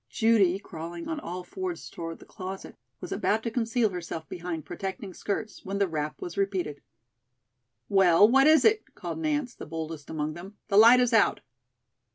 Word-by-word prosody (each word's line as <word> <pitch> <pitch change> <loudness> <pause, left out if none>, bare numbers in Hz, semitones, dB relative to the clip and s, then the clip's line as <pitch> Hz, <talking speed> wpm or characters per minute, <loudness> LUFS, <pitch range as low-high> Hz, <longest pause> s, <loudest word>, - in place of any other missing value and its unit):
Judy, 215 -6 +3
crawling 170 -3 -8
on 320 -2 -3
all 180 - -6
fours 370 - -5
toward 165 -1 -7
the - - -15
closet, 190 +1 -8 0.3
was - - -7
about 220 +2 0
to 230 - -2
conceal 230 -1 +1
herself 170 -3 -6
behind 170 -3 -5
protecting 190 +3 -6
skirts, 210 +3 -4
when 195 +1 -3
the 200 -1 +2
rap 150 -3 -3
was 175 - -6
repeated. 185 -7 -1 1.1
"Well, 195 0 +6
what 270 +5 +5
is 315 0 +6
it?" 440 -1 +2
called - - -5
Nance, 295 -5 -1
the - - -10
boldest 160 -1 -6
among 155 -1 -2
them, 185 +5 -11
"the 200 - +3
light 235 +4 +8
is 245 -1 +1
out." 220 -3 +4
195 Hz, 175 wpm, -27 LUFS, 170-230 Hz, 1.1 s, light